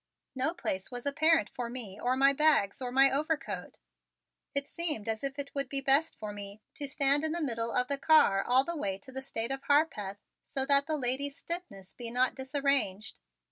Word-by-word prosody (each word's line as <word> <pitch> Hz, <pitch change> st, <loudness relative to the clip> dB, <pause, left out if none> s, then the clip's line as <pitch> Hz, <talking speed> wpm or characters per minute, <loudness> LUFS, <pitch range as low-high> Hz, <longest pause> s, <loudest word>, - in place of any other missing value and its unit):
No 270 Hz, +6 st, 0 dB
place 190 Hz, -, -3 dB
was 245 Hz, 0 st, -7 dB
apparent 315 Hz, +3 st, +3 dB
for 245 Hz, -2 st, -4 dB
me 225 Hz, -5 st, -6 dB
or 250 Hz, +1 st, 0 dB
my 275 Hz, +1 st, +5 dB
bags 285 Hz, -8 st, +2 dB
or 250 Hz, -1 st, -4 dB
my 270 Hz, +1 st, +5 dB
overcoat. 295 Hz, 0 st, -3 dB, 0.8 s
It 280 Hz, 0 st, 0 dB
seemed 300 Hz, -10 st, 0 dB
as 220 Hz, +1 st, -2 dB
if 275 Hz, 0 st, -3 dB
it 280 Hz, -1 st, -6 dB
would 275 Hz, -2 st, -2 dB
be 275 Hz, -, +1 dB
best 275 Hz, +4 st, +3 dB
for 210 Hz, -1 st, -6 dB
me 200 Hz, 0 st, -8 dB
to 285 Hz, -, -3 dB
stand 280 Hz, +1 st, +2 dB
in 315 Hz, 0 st, 0 dB
the 345 Hz, -, -1 dB
middle 230 Hz, -6 st, -2 dB
of 250 Hz, +1 st, +1 dB
the 280 Hz, 0 st, -2 dB
car 290 Hz, -12 st, +4 dB
all 255 Hz, +2 st, +3 dB
the 340 Hz, +3 st, -3 dB
way 195 Hz, -10 st, -2 dB
to 230 Hz, +7 st, -12 dB
the 265 Hz, 0 st, -5 dB
State 235 Hz, -2 st, -3 dB
of 270 Hz, 0 st, -3 dB
Harpeth 280 Hz, -10 st, +1 dB, 0.3 s
so 265 Hz, -1 st, -2 dB
that 280 Hz, 0 st, +3 dB
the 310 Hz, -1 st, 0 dB
lady's 275 Hz, +2 st, -1 dB
stiffness 270 Hz, -, -6 dB
be 240 Hz, -2 st, -5 dB
not 250 Hz, +2 st, +1 dB
disarranged. 265 Hz, -6 st, -1 dB
270 Hz, 205 wpm, -30 LUFS, 235-285 Hz, 0.8 s, my